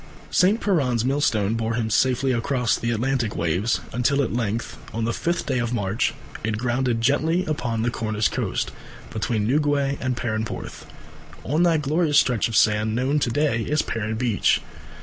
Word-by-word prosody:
St. 200 +5 +3
Piran's 130 - +1
millstone 115 -7 +1
bore 115 0 -1
him 110 -1 -1
safely 130 +3 +2
across 125 0 +1
the 115 - -2
Atlantic 120 -1 0
waves 90 +7 0
until 140 +4 +2
at 120 - -2
length 115 -1 -2 0.2
on 115 0 -1
the 115 - 0
fifth 170 +1 -1
day 130 -3 0
of 120 0 -1
March 105 0 0 0.3
it 110 0 -1
grounded 120 0 0
gently 160 +8 +2
upon 120 -8 -2
the 120 - 0
Cornish 110 -2 0
coast, - - -2 0.4
between 110 -1 -1
Newquay 140 +1 +1
and 130 -1 -1
Perranporth, 110 -2 -4 0.6
on 155 +5 0
that 165 -3 +3
glorious 150 +1 +2
stretch 125 -6 +3
of 115 - -4
sand 110 +1 +3
known 135 +5 +1
to 130 - 0
day 130 -3 +1
as 150 0 +2
Perran 110 0 -3
Beach. 115 -5 +2
120 Hz, 170 wpm, -23 LUFS, 110-140 Hz, 0.6 s, St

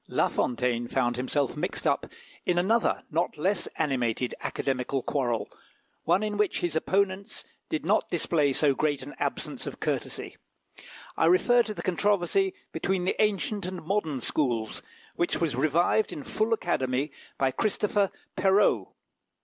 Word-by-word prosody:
La - - +2
Fontaine 120 -1 0
found 120 -1 +1
himself 130 +2 0
mixed - - -3
up - - +1 0.4
in 175 - +1
another 215 +6 +2
not 165 0 0
less 180 +3 0
animated 125 -5 0
Academical 130 0 -2
quarrel, 120 -5 0 0.6
one 195 - +3
in 210 -1 -2
which 210 -2 +1
his 175 -3 -1
opponents 190 +3 0 0.3
did 155 - -2
not 205 +5 +2
display 155 -4 +2
so 140 +1 +3
great 145 -1 0
an 145 - -8
absence - - -3
of - - -6
courtesy. - - -3 0.8
I 160 - +3
refer 240 +8 +5
to 220 -2 -3
the - - -6
controversy 205 - +1 0.2
between 190 -2 -1
the - - +1
ancient 205 -1 0
and 185 -2 -6
modern 160 -7 -1
schools, 120 -8 -1 0.4
which 175 - 0
was 160 -7 0
revived 165 - +2
in 145 - -6
full 215 +9 -1
Academy 140 - 0 0.3
by 135 -1 +2
Christopher 205 - +1 0.3
Perrault. 195 +2 +3
170 Hz, 145 wpm, -28 LUFS, 135-200 Hz, 0.8 s, refer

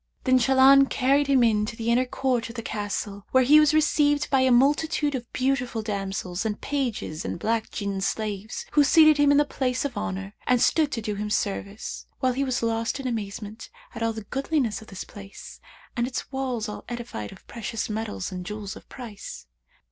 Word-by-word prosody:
Then 255 -1 +4
Shahlan 270 +1 +6
carried 275 +2 +2
him 270 -3 +4
into 215 0 +1
the 230 +1 -1
inner 250 +2 +2
court 250 -3 -1
of 230 - -10
the 230 - -5
Castle, 205 -1 -4
where 260 0 +4
he 295 +4 +7
was 305 -1 +5
received 295 -2 +2
by 270 - +4
a 260 - +4
multitude 290 +4 +3
of 245 -3 -5
beautiful 255 -4 -1
damsels 195 -3 -3
and 215 -2 -2
pages 240 - -3
and - - -4
black 225 +5 -1
Jinn 200 -2 -3
slaves, 210 +1 -3
who 295 - +5
seated 310 +1 +6
him 290 -1 +4
in 285 - +5
the 295 - +4
place 255 -1 -1
of 270 -4 -3
honour 195 -1 -4
and 250 -1 +4
stood 305 +4 +3
to 230 - -3
do 210 -1 -2
him 210 +1 -4
service, 200 0 -3
whilst 255 -1 0
he 275 - +2
was 255 -3 -1
lost 230 +3 -1
in 270 - -6
amazement 215 -2 -5 0.2
at - - -7 0.2
the 220 - -6
goodliness 270 -1 -1
of 220 - -13
the 190 - -7
place, 200 -1 -11 0.4
and 240 -1 0
its 255 +1 -5
walls 255 -4 -2
all 210 - -7
edified 235 - -6
of - - -15
precious 225 -1 -4
metals 210 - -4
and 180 -1 -5
jewels 210 0 -6
of - - -14
price. 230 -6 -9
235 Hz, 195 wpm, -25 LUFS, 210-270 Hz, 0.4 s, he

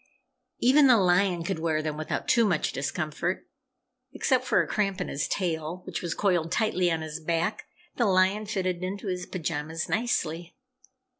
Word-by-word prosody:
Even 275 +3 +5
the 250 -3 +7
lion 180 -2 +2
could 170 -1 -2
wear 160 -1 0
them 155 -1 -2
without 155 0 -3
too 235 - +4
much 180 -8 +1
discomfort. 155 +5 -3 0.7
Except 255 -3 +1
for - - +3
a - - -7
cramp 200 -2 -1
in 180 - -3
his 140 - -2
tail 170 -1 -2
which - - -4
was 170 -2 -3
coiled 175 -5 +1
tightly 185 -5 +1
on 165 -1 -1
his 155 0 -5
back, 165 +6 -1 0.3
the 235 - +3
lion 190 +3 +2
fitted 185 -3 -2
into 195 +3 -4
his 180 -2 -3
pajamas 160 -1 -3
nicely. 175 -7 -1
180 Hz, 165 wpm, -27 LUFS, 160-200 Hz, 0.7 s, the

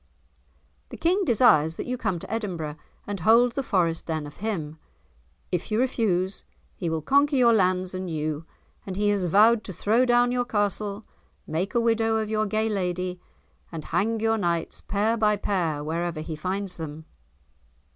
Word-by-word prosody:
"The - - -8
King 370 +4 +1
desires 165 - +4
that - - -5
you 250 - -2
come 190 -7 -2
to 180 - -7
Edinburgh, 175 -9 -3 0.3
and 205 -1 -4
hold 230 +7 +5
the 275 - -2
Forest 175 -9 0
then 160 -2 -2
of 145 - -11
him. 165 -8 -4 0.7
If 180 - -2
you 215 +1 +1
refuse, 200 -7 0 0.3
he 175 - -3
will 160 -1 -2
conquer 280 - +3
your 240 -3 +5
lands 185 -3 +1
and 185 -1 -4
you, 155 0 -3 0.4
and 190 - -6
he 205 +1 +1
has 200 -3 +1
vowed 215 +6 +5
to - - -6
throw 225 +8 +2
down 245 0 +3
your 250 0 +1
castle, 205 -1 -2 0.4
make 180 +9 -3
a - - +4
widow 225 -1 +2
of 215 -1 -2
your 215 0 +1
gay 215 +2 0
lady, 180 -3 -2 0.5
and 160 -3 -6
hang 225 +2 +1
your 225 0 +1
knights 170 -3 -2
pair 215 +3 0
by 210 -1 +3
pair 170 -7 -1
wherever 165 +1 -2
he 155 0 -5
finds 185 +4 -3
them." 160 -1 -7
200 Hz, 175 wpm, -25 LUFS, 170-225 Hz, 0.7 s, hold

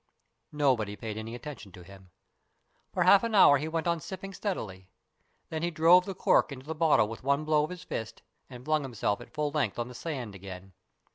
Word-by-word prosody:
Nobody 130 -9 +1
paid 110 0 -6
any 110 +2 -6
attention 125 -6 -9
to 90 - -12
him. 95 0 -15 0.8
For 180 - +1
half 195 +4 +6
an 230 -2 -1
hour 145 -8 +7
he 155 - -3
went 160 0 -2
on 170 -1 +1
sipping 195 +3 -8
steadily, 95 - -5 0.6
then 160 -1 -4
he 170 - 0
drove 175 +2 +5
the 195 - -5
cork 165 - +3
into 130 -1 -9
the 160 - -4
bottle 155 -9 +3
with 110 +1 -8
one 140 +3 +1
blow 155 -1 +3
of 150 - -3
his 180 -1 -8
fist, 110 - -6 0.3
and 125 0 -11
flung 155 0 +1
himself 115 -6 -2
at - - -12
full 150 -1 -2
length 150 -2 -1
on 120 0 -3
the - - -10
sand 125 -5 -5
again. 95 0 -10
145 Hz, 210 wpm, -29 LUFS, 110-165 Hz, 0.8 s, hour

